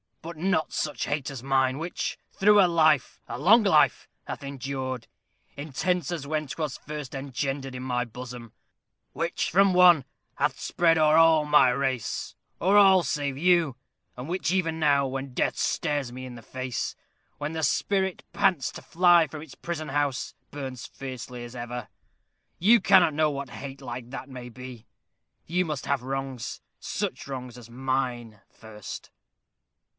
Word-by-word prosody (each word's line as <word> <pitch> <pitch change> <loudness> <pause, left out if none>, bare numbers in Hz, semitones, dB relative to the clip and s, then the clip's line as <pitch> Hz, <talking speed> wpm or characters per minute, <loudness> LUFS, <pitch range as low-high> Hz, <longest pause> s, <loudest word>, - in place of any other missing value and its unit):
"But 165 0 -7
not 175 -1 0
such 150 - -2
hate 145 0 -2
as 135 -4 -7
mine, 130 -1 +2
which, 165 +3 -3
through 210 +1 +5
a - - +6
life, 155 -5 +3
a 120 - -5
long 215 +10 +6
life, 155 -7 +3 0.2
hath - - -6
endured, 130 -3 -4 0.5
intense 160 +4 -1
as 165 -5 -4
when 155 0 -1
'twas 150 -1 -4
first 150 -3 -7
engendered 135 0 -3
in 125 - -5
my 125 -1 -1
bosom; 120 -1 -9 0.6
which - - -1
from 195 +2 +4
one 175 -6 +6 0.3
hath - - 0
spread 165 -1 +2
o'er 155 0 +5
all 165 -2 +6
my 150 -3 +6
race 130 -3 -2 0.2
o'er 195 +3 +4
all 190 -2 +7
save 140 -4 -2
you 170 -4 +3 0.4
and 125 +2 -7
which 180 0 -1
even 165 -4 0
now, 140 -3 +3
when 135 0 -5
death - - 0
stares 145 -6 -1
me 130 +1 -7
in 125 -1 -8
the 115 - -10
face 130 0 -4 0.4
when 145 +2 -4
the 160 -1 -3
spirit 190 +2 0
pants 190 -9 +1
to - - -8
fly 175 -1 +4
from 155 -1 -8
its 160 - -11
prison 160 -3 -5
house, 145 -2 -1 0.2
burns 135 -4 -6
fiercely 125 -2 -7
as 120 +1 -9
ever. 120 0 -6 0.7
You 225 +7 +6
cannot 175 -4 +5
know 155 +1 +2
what 140 -2 -5
hate 135 +1 -8
like 120 -1 -7
that 135 - -7
may 125 -2 -8
be. 125 -2 -10 0.6
You 180 +3 0
must 150 -4 -4
have 140 -3 0
wrongs 135 -2 -4 0.2
such - - -4
wrongs 125 -3 -6
as 120 -1 -12
mine 125 -3 -2
first." 105 -2 -10
140 Hz, 160 wpm, -27 LUFS, 130-165 Hz, 0.7 s, all